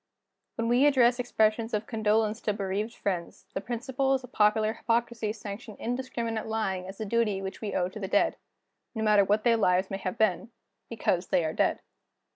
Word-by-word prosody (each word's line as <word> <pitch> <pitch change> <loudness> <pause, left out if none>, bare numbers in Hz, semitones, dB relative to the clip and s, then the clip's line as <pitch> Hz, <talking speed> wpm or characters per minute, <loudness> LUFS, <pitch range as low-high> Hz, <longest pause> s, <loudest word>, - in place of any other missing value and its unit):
When 230 - -1
we 245 +5 +5
address 250 -3 +4
expressions 225 -1 +1
of 210 +1 -2
condolence 220 0 +1
to 210 - 0
bereaved 205 +3 -3
friends, 185 -1 -4
the 190 - -2
principles 260 +3 -1
of 250 - -11
popular 215 -1 +3
hypocrisy 230 -2 -1
sanction 210 0 -8
indiscriminate 235 -3 -3
lying 195 -5 -2
as 195 +1 -9
a 220 - -3
duty 210 -2 +1
which 195 0 -6
we 210 -3 -3
owe 180 -1 +1
to 210 - -9
the 195 - -3
dead - - +2 0.6
no 220 - -2
matter 210 -2 +5
what 210 +2 +1
their 235 -1 +4
lives 185 -2 +2
may 195 - -3
have 185 -1 -4
been 215 0 +1 0.4
because 185 -5 0
they 170 - +2
are 155 - -2
dead. - - +1
220 Hz, 185 wpm, -28 LUFS, 200-235 Hz, 0.6 s, we